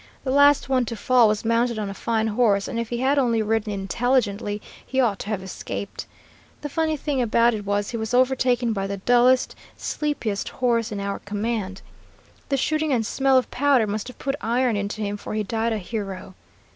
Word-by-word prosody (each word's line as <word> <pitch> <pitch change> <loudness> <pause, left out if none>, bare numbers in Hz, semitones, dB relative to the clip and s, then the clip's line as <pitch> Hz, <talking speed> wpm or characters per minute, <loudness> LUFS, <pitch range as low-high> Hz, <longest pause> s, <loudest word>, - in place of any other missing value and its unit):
The 260 - -1
last 285 +1 +5
one 260 -2 +2
to 230 - -5
fall 245 +1 +4
was 210 +1 -1
mounted 230 +1 +1
on 210 -2 -2
a 195 - -5
fine 220 +2 -1
horse, 210 -3 +2
and 230 - -3
if 235 -1 -3
he 240 - -2
had 275 +2 +3
only 230 -4 +2
ridden 215 0 0
intelligently, 205 0 0 0.2
he 265 - -2
ought 225 -7 +2
to - - -6
have 210 -3 -2
escaped. 190 +1 -6 0.5
The 295 - -4
funny 315 +1 0
thing 285 -2 -1
about 235 0 +3
it 205 -2 -5
was 205 0 0
he 235 - -3
was 220 -1 -4
overtaken 250 -2 +2
by 195 -1 -2
the 200 0 -4
dullest, 245 +5 +3 0.2
sleepiest 240 -10 -2
horse 235 -2 0
in 205 - -4
our 200 0 -3
command. 205 -2 -3 0.7
The 275 - +1
shooting 310 +2 0
and 235 -4 +1
smell 270 +3 +2
of 255 - 0
powder 275 -4 +3
must 210 +1 -3
have 250 - -10
put 275 - -2
iron 240 0 +1
into 205 +1 -3
him, 205 0 -2
for 210 - -6
he 215 - 0
died 225 +2 -1
a 220 - 0
hero. 195 -2 -5
230 Hz, 205 wpm, -23 LUFS, 205-255 Hz, 0.7 s, last